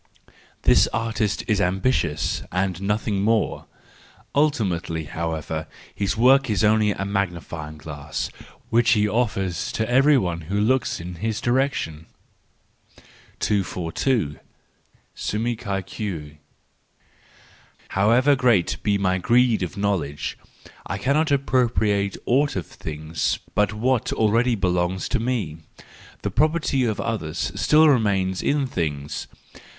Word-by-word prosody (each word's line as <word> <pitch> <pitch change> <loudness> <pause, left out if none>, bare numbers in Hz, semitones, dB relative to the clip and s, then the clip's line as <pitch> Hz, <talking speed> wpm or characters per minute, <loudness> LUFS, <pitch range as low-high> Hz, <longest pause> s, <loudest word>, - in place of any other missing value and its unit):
—This - - +5
artist 110 -2 -1
is 105 -3 +2
ambitious 90 - 0
and 90 -1 -1
nothing 105 0 0
more; 110 +1 0 0.7
ultimately, 100 - 0
however, 80 0 -4 0.3
his 100 0 -1
work 130 +2 +5
is 100 -5 +1
only 110 0 +4
a 100 -1 -2
magnifying 85 -6 -3
glass, 75 -2 -5 0.4
which 115 +1 +4
he 105 -2 +3
offers 100 -6 -1
to 110 - -1
every 135 +4 +5
one 85 -7 -1
who 100 +1 0
looks 130 +5 +1
in 85 +1 -7
his 110 +2 -2
direction. 120 - -1 1.3
242. 90 - 0 0.7
Suum 110 +2 -2
cuique. 95 -6 -5 1.5
—However 120 +8 +4
great 120 -9 +2
be 100 -1 +1
my 95 -1 +1
greed 120 +2 +3
of 90 +2 -4
knowledge, 90 -8 -1 0.5
I 95 - -3
cannot 140 +9 +1
appropriate 115 -7 +1
aught 145 +4 +2
of 90 -4 -2
things 75 0 -3 0.2
but 105 -1 +2
what 120 +3 0
already 115 +3 +2
belongs 90 -1 0
to - - +1
me,—the 105 -11 -5
property 150 -3 +1
of 110 -3 -1
others 80 -9 -2
still 155 +1 +4
remains 100 -8 +2
in 145 0 +1
the - - 0
things. 75 - -3
100 Hz, 115 wpm, -23 LUFS, 85-120 Hz, 1.5 s, This